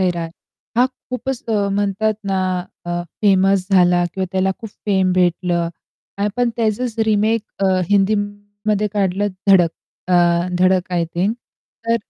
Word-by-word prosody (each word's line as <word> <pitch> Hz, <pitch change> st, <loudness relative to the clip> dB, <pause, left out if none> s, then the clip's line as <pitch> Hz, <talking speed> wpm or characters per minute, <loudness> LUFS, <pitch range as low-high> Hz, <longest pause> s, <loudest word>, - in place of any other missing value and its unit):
सैराट 175 Hz, -3 st, -1 dB, 0.5 s
हा 245 Hz, +2 st, +5 dB
खूपच 260 Hz, 0 st, -6 dB
म्हणतात 205 Hz, 0 st, 0 dB
ना, 190 Hz, -1 st, +1 dB, 0.5 s
अ, 175 Hz, 0 st, -2 dB, 0.2 s
फेमस 195 Hz, -1 st, +3 dB
झाला 180 Hz, -2 st, +4 dB
किंवा 190 Hz, -, -1 dB
त्याला 190 Hz, 0 st, +1 dB
खूप 225 Hz, -, -7 dB, 0.2 s
फेम 190 Hz, -2 st, +2 dB
भेटलं 175 Hz, -1 st, +1 dB, 0.5 s
आणि 200 Hz, -, 0 dB
आपण 240 Hz, +4 st, 0 dB
त्याचच 230 Hz, +1 st, -1 dB
रिमेक 215 Hz, +1 st, +2 dB, 0.2 s
अ, -, -, +4 dB, 0.2 s
हिंदीमध्ये 205 Hz, +1 st, 0 dB
काढलं 200 Hz, 0 st, 0 dB, 0.2 s
धडक 175 Hz, -4 st, +6 dB, 0.4 s
अ, 180 Hz, -, +3 dB, 0.4 s
धडक 185 Hz, 0 st, +2 dB
आय 170 Hz, -1 st, +1 dB
थिंक 190 Hz, +6 st, +1 dB, 0.5 s
तर 230 Hz, -, +4 dB
200 Hz, 130 wpm, -19 LUFS, 185-215 Hz, 0.5 s, धडक